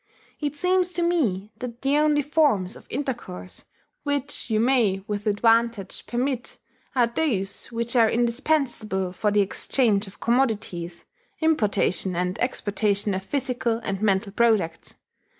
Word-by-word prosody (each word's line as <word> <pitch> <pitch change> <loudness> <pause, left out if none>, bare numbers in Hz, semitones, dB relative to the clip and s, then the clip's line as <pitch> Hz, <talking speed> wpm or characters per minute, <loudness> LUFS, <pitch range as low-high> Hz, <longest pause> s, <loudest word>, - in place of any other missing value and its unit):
It 295 -1 -3
seems 365 +2 +2
to 345 0 0
me 220 - 0
that 245 0 -7
the 275 +2 +3
only 300 -1 +3
forms 280 - +2
of - - -15
intercourse 240 -9 -5 0.4
which 285 -2 -3
you 215 -1 +2
may 225 -6 +2
with 210 0 -3
advantage 225 -1 +1
permit 250 0 -2 0.4
are 245 -2 +5
those 230 -6 -1
which 235 +1 -3
are 230 -2 +5
indispensable 235 -6 0
for 210 +3 0
the 205 0 +3
exchange 205 +1 +1
of 195 - -14
commodities 215 -9 -1 0.3
importation 205 - +1
and 180 +3 -1
exportation 205 -4 0
of 190 0 -3
physical 245 -1 -1
and 195 0 -3
mental 200 -1 +1
products. 210 -7 +1
230 Hz, 135 wpm, -25 LUFS, 200-270 Hz, 0.4 s, are